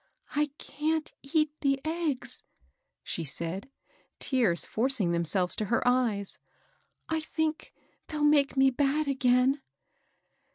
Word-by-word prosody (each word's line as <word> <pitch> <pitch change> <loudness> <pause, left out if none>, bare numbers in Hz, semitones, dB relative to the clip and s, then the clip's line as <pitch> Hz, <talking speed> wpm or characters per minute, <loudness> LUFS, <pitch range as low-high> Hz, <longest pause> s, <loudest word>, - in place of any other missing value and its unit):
^* - - -41 0.3
I 300 +1 +2
can't 310 +1 -2
eat 305 +2 +1
the 275 -1 +2
eggs," 310 -7 -1 0.6
she 170 - -3
said, 170 - -4 0.5
tears 230 -11 +1
forcing 230 -6 +1
themselves 170 +2 +1
to 215 - -1
her 230 +4 +1
eyes. 230 -6 +2 0.7
^^I 320 -1 -1
think 315 0 -2 0.4
they'll 300 -2 -3
make 290 -2 +4
me 270 0 +5
bad 285 +3 +1
again." 265 0 +3
270 Hz, 120 wpm, -29 LUFS, 220-300 Hz, 0.7 s, me